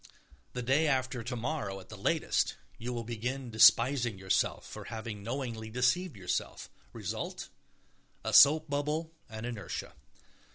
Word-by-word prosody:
The 125 - -3
day 140 +6 +3
after 130 -3 0
tomorrow, 120 -3 -3
at 95 - -14
the - - -8
latest, - - +1 0.2
you 120 +2 -4
will 120 -1 -3
begin 120 +3 -4
despising 120 0 +5
yourself 95 0 0
for - - -9
having 110 -2 -6
knowingly 115 -1 -4
deceived 125 - +1
yourself. 90 -2 -3 0.2
Result: - - -5 0.7
a - - -2
soap 155 +2 +8
bubble 150 +3 -2 0.2
and 110 +1 -6
inertia. 115 -4 -5
125 Hz, 130 wpm, -31 LUFS, 110-140 Hz, 0.7 s, soap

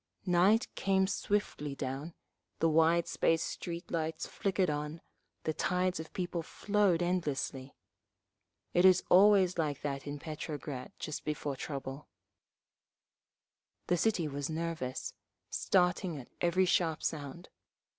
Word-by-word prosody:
Night 185 +5 +4
came 190 -1 +2
swiftly 190 -8 -1
down, 140 +5 -4 0.4
the 165 - +2
wide 165 +2 +4
spaced 165 0 +2
street 170 0 -6
lights 160 -1 -2
flickered 190 -2 0
on, 150 +1 -3 0.4
the 155 - 0
tides 180 +1 0
of 160 - -7
people 175 -2 -2
flowed 200 0 +1
endlessly…. 145 -6 -2 1.0
It 175 - +4
is 185 -1 +6
always 190 -2 +6
like 150 -3 -1
that 140 -1 -3
in 145 0 -4
Petrograd 150 -3 -6
just 155 - -5
before 150 -2 -2
trouble…. 135 +1 -6 1.8
The 175 - +2
city 190 -5 +1
was 145 0 -3
nervous, 160 -5 -3 0.4
starting 180 -2 +1
at 130 - -10
every 180 +2 +3
sharp 165 -3 +1
sound. 150 +3 -4
165 Hz, 120 wpm, -32 LUFS, 145-180 Hz, 1.8 s, is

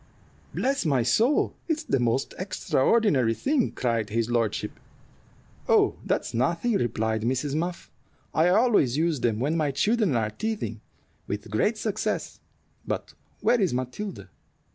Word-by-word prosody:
"Bless 275 +2 0
my 135 -7 +2
soul! 225 - +2
it's 320 -2 -1
the 135 - 0
most 120 +2 0
extraordinary 180 - +2
thing," 275 - +1
cried 115 -4 -1
his 115 +2 -1
lordship. 115 -3 -1 0.9
"Oh, - - +4
that's - - -1
nothing," 170 - +1
replied 110 - 0
Mrs. 130 +5 -1
Muff; 170 +3 -3 0.4
"I 160 +3 +4
always 200 - +3
use 160 -2 +1
them 115 -3 0
when 145 +6 0
my 155 -3 +1
children 200 - +1
are 110 -2 0
teething, 155 - -4 0.5
with 105 +1 -5
great 210 - +1
success. 215 0 -2 0.4
But - - -4 0.3
where 240 -2 +3
is 180 -10 +1
Matilda?" 130 +12 -5
145 Hz, 135 wpm, -26 LUFS, -, 0.9 s, Oh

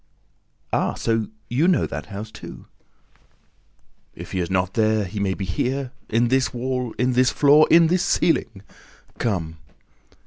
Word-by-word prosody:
"Ah, - - 0
so 115 -2 -1 0.2
you 140 +8 +1
know 185 - +3
that - - -6
house 105 +2 -7
too?" - - -11 1.5
"If - - -10
he 95 - -2
is 85 - -2
not 95 0 0
there, 110 -2 +1
he 100 +3 -6
may 95 -2 0
be 95 - -4
here, 130 +8 -2 0.2
in 115 +2 +2
this 130 0 +2
wall, 125 -1 -3
in 125 +1 +1
this 125 0 +4
floor, 150 +2 +5
in 170 0 +6
this 175 +2 +1
ceiling!... 115 - 0 0.6
Come!" 85 -8 -2
115 Hz, 150 wpm, -22 LUFS, 100-130 Hz, 1.5 s, in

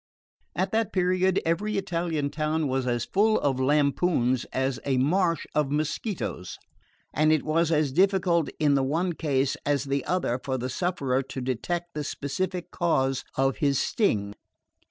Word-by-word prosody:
At 190 +2 0
that 225 -1 0
period 185 0 +2
every 200 +6 0
Italian 165 -6 -1
town 155 0 -1
was 130 -1 -1
as 120 -1 0
full 215 +2 +2
of 135 -2 0
lampoons 140 -2 +2
as 130 0 -2
a 135 -2 0
marsh 165 +5 +1
of 150 -2 +1
mosquitoes, 150 - -3 0.6
and 155 +1 +3
it 155 -2 +2
was 165 +1 +1
as 150 -3 +2
difficult 180 -1 +2
in 150 -2 +3
the 140 - +3
one 165 +7 0
case 140 -4 0
as 145 -2 +1
the 140 -1 -1
other 175 -9 0
for 130 -1 -2
the 125 +1 -3
sufferer 135 -4 0
to 135 0 -7
detect 175 +8 -3
the 150 - -3
specific 175 +6 -3
cause 135 -6 0
of 135 0 +1
his 140 -2 +1
sting. 105 - 0
150 Hz, 155 wpm, -26 LUFS, 135-175 Hz, 0.6 s, and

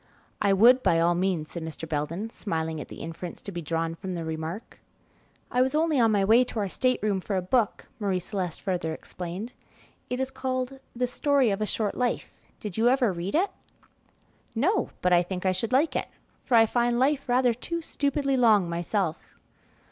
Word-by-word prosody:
"I 200 - +3
would, 240 +6 +6
by 165 - +3
all 170 +1 +4
means," 175 -3 -1
said 170 - -5
Mr. 160 0 -6
Belden, 165 +8 -3
smiling 160 -7 -3
at - - -8
the - - -10
inference 165 +2 -6
to 200 - -6
be 175 -2 -5
drawn 165 +1 -1
from 185 +2 -5
the 165 -1 -4
remark. 160 +6 -5 0.7
"I 250 - +2
was 260 +3 +2
only 310 -2 +2
on 225 -2 +4
my 200 -2 +3
way 230 +5 +6
to 250 - -7
our 200 -2 -1
state 255 +6 +1
room 205 -3 +1
for 200 - -3
a 185 - +1
book," 220 +3 +1
Marie 200 -3 0
Celeste 180 -2 -4
further 175 -4 -1
explained. 185 +10 -6 0.6
"It 250 - -2
is 265 0 -1
called 260 0 -3 0.2
'The 250 +1 +1
Story 270 -1 +2
of 195 +2 -2
a 215 - 0
Short 210 0 -1
Life.' 250 -1 -2 0.3
Did 205 -4 -6
you 230 +2 +4
ever 250 -6 +3
read 175 +6 -3
it?" 380 +5 +2 1.0
"No, 365 - +1
but 180 0 +4
I 175 - +6
think 180 +1 -5
I 185 - +4
should 200 +5 -2
like 280 +5 +3
it, - - -1 0.4
for 250 - +2
I 225 -1 +7
find 240 +1 +1
life 275 +1 +1
rather 245 0 +4
too 335 +8 -4
stupidly 280 -2 0
long 220 -7 +5
myself." 170 0 -2
210 Hz, 200 wpm, -27 LUFS, 175-250 Hz, 1.0 s, I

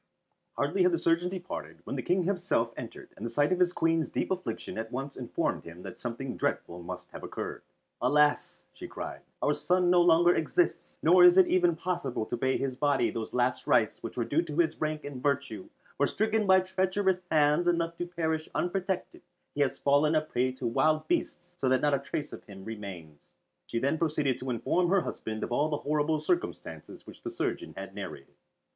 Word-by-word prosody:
Hardly 155 +7 0
had 180 -1 +4
the - - +3
surgeon 170 +2 +1
departed, 85 - -6
when - - -5
the 130 - -2
King 180 +7 +1
himself 175 -11 0
entered, - - -9
and - - -10
the 115 - -2
sight 145 +7 +2
of 185 - +1
his 180 -1 +4
Queen's 165 -2 +1
deep - - -2
affliction 180 -12 -3
at 110 +1 -5
once 135 +2 -4
informed 125 -2 -2
him 85 +2 -11
that 95 - -9
something 125 +2 -4
dreadful 85 +1 -2
must 90 0 -8
have - - -9
occurred. - - -5 0.4
"Alas," 150 0 +2
she - - -8
cried, - - -7 0.2
"our - - +3
son 180 0 +2
no 180 -1 +6
longer 175 0 +5
exists, 165 +3 0
nor 180 +3 +7
is 180 +1 +8
it 190 - +8
even 175 -2 +3
possible 165 -10 -2
to 120 - -3
pay 130 +2 +1
to - - -3
his 130 -2 -2
body 145 0 +2
those 115 -1 -4
last 125 0 0
rites - - +2
which - - -7
were 120 - 0
due 145 +8 +2
to 155 -3 -6
his 160 -2 +1
rank 155 0 -1
and 140 -3 -6
virtue, 140 -8 -1 0.3
for - - +3
stricken 220 0 0
by 190 0 +6
treacherous 190 0 0
hands 150 +2 +3
and 175 -1 +4
left 170 0 -3
to 175 - -2
perish 160 -2 -2
unprotected 185 0 -2 0.3
he 145 - -1
has 135 -1 +1
fallen 145 +3 +3
a 155 - +4
prey 130 -4 0
to 130 0 -7
wild 155 +6 +2
beasts 180 - -2
so 130 - +2
that 130 0 +3
not 145 -1 +2
a 140 - +3
trace 145 +2 -4
of - - -9
him 95 -2 -11
remains." 95 -9 -8 0.4
She 115 - -3
then 140 +6 +1
proceeded 150 -5 0
to 130 - -5
inform 170 +9 +1
her 195 0 +4
husband 110 -8 -5
of - - -4
all 145 +5 +2
the 150 - 0
horrible 150 +1 +1
circumstances 345 - -3
which - - -13
the 350 - -4
surgeon 350 - -3
had - - -7
narrated. - - -8
150 Hz, 210 wpm, -29 LUFS, 125-175 Hz, 0.4 s, is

